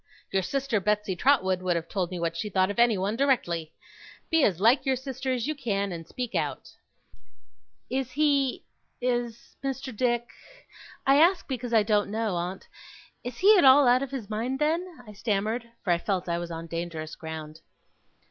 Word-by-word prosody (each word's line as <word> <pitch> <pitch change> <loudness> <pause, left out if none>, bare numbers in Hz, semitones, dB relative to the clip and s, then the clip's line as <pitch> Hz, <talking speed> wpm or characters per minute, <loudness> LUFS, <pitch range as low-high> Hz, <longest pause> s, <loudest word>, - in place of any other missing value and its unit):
Your 195 - +2
sister 265 +2 -1
Betsey 210 -1 0
Trotwood 190 -6 +2
would 180 -1 0
have 165 0 -3
told 185 -2 -2
me 180 -1 -5
what 165 0 -1
she 190 +5 -3
thought 190 0 +2
of 205 - -5
anyone, 215 -3 +3
directly. 175 - 0 0.6
Be 325 -2 +4
as 185 -8 +2
like 235 +7 +4
your 265 -1 +1
sister 260 0 -4
as 245 -2 -1
you 310 - -1
can, 200 -8 -2
and 165 -2 -7
speak 250 +3 -5
out!' - - -2 1.2
'Is 260 -1 -3
he 280 -2 +1 0.4
is 240 -2 -3
Mr. 265 -2 -4
Dick 240 0 0 0.8
I 275 +1 +5
ask 345 +4 +4
because 250 -3 -4
I 220 -2 +5
don't 205 -1 +1
know, 220 -1 -1
aunt 180 +2 -4 0.6
is 245 0 -6
he 415 +3 +6
at - - +4
all 270 0 +7
out 250 +1 +5
of 275 - -3
his 255 -6 -5
mind, 230 +5 -2
then?' 320 0 -1
I 210 - -11
stammered; 215 +3 -2
for 185 - 0
I 170 - 0
felt 185 -1 -2
I 170 0 -1
was 175 0 -5
on 165 0 -6
dangerous 165 -2 -5
ground. 160 -1 -8
225 Hz, 185 wpm, -27 LUFS, 185-265 Hz, 1.2 s, all